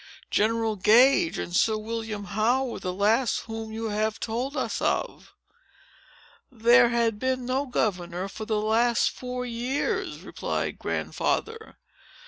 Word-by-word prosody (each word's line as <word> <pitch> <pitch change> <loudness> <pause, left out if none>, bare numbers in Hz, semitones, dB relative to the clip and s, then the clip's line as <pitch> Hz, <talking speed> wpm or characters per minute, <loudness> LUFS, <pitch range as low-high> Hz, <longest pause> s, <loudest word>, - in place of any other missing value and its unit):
"General 220 0 +1
Gage 260 - +5
and 175 - -4
Sir 220 +3 +3
William 220 -1 -4
Howe 220 +7 +1
were 245 - -5
the 185 - -3
last 215 +6 +1
whom 225 -1 -7
you 225 0 -4
have 215 +1 -1
told 250 +6 -3
us - - -2
of." - - -2 1.2
"There 240 +1 +5
had 230 -3 +1
been 260 0 -1
no 265 +3 -1
governor 185 -6 -2
for 215 +2 -7
the 215 -1 0
last 225 +2 +2
four 250 0 -5
years," 245 +4 -2
replied - - -4
Grandfather. 450 0 -2
225 Hz, 130 wpm, -26 LUFS, 215-250 Hz, 1.2 s, Gage